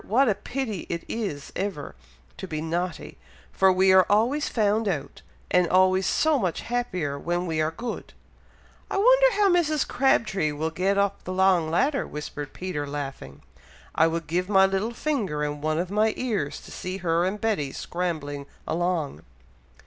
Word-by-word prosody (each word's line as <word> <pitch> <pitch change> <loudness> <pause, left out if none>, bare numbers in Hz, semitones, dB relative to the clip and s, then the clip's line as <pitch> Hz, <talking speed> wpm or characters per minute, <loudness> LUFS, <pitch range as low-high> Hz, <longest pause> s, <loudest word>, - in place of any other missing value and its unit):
what 260 +6 +3
a 215 - +4
pity 215 -1 -4
it 170 0 -3
is 195 -11 -4
ever 190 -7 -4 0.4
to 190 - -7
be 155 -3 -4
naughty, 170 +3 -4 0.3
for 190 0 +4
we 190 +1 +4
are 185 -1 +6
always 235 +9 +2
found 215 0 +1
out, 160 -8 -3 0.3
and 180 -1 +4
always 185 +1 +4
so 310 -3 +2
much 185 -6 -1
happier 180 -13 -2
when 175 +3 -1
we 160 -2 -1
are 155 - +1
good!" 230 +9 -6 0.8
"I - - -2
wonder - - +5
how 410 -1 +3
Mrs. 310 -4 +2
Crabtree 205 - +1
will 160 +2 -2
get 190 +4 0
up 200 0 0
the 185 - -5
long 185 -4 +3
ladder?" 275 - +1
whispered 145 -1 -6
Peter, 175 -6 -4
laughing. 135 - -6 0.5
"I 160 - +4
would 165 0 -2
give 180 +4 -1
my 195 -2 +6
little 195 +5 -1
finger, 210 - -1
and 145 0 -3
one 155 +1 0
of 175 +2 -2
my 215 +1 +2
ears, 205 - -2
to - - -13
see 185 +1 -5
her 165 +1 +2
and 190 +3 -1
Betty 200 -12 -1
scrambling 150 -6 -4 0.2
along!" 170 - -1
185 Hz, 170 wpm, -25 LUFS, 160-215 Hz, 0.8 s, are